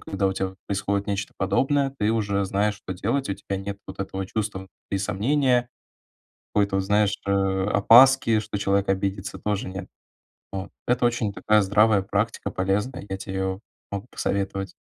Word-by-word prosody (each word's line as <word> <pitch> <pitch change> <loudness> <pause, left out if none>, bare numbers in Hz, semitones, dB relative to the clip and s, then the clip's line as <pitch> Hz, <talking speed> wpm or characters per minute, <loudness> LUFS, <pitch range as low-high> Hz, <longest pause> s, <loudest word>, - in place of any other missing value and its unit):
когда 100 0 -1
у - - -1
тебя 95 0 -2
вот 95 - -13
происходит 100 0 -1
нечто 100 -1 -3
подобное, 135 +7 +1
ты 105 0 +2
уже 100 -3 0
знаешь, 105 +2 0
что 95 -2 -7
делать, 115 +8 -1
у 100 - -1
тебя 95 0 -5
нет 100 +1 -5
вот - - -8
этого 95 0 -3
чувства 105 -1 -3
внутри 95 +1 -6
сомнения, 120 +5 +1 0.9
какой-то 100 -1 +2
вот, 95 - +1
знаешь, 105 +1 +2
э, 100 - 0
опаски, 105 +5 +5
что 105 -1 -4
человек 100 0 +1
обидится, 95 0 -2
тоже 105 -2 -2
нет. 95 0 -6 0.6
Вот. 95 0 -5 0.2
Это 125 0 +2
очень 115 -4 -1
такая 105 0 +3
здравая 100 0 +4
практика, 100 +3 -1
полезная, 100 +7 -1
я 95 - -3
те 95 - -7
её 95 +1 -2 0.3
могу 100 +4 -4
посоветовать. 95 -1 -2
100 Hz, 170 wpm, -25 LUFS, 95-105 Hz, 0.9 s, опаски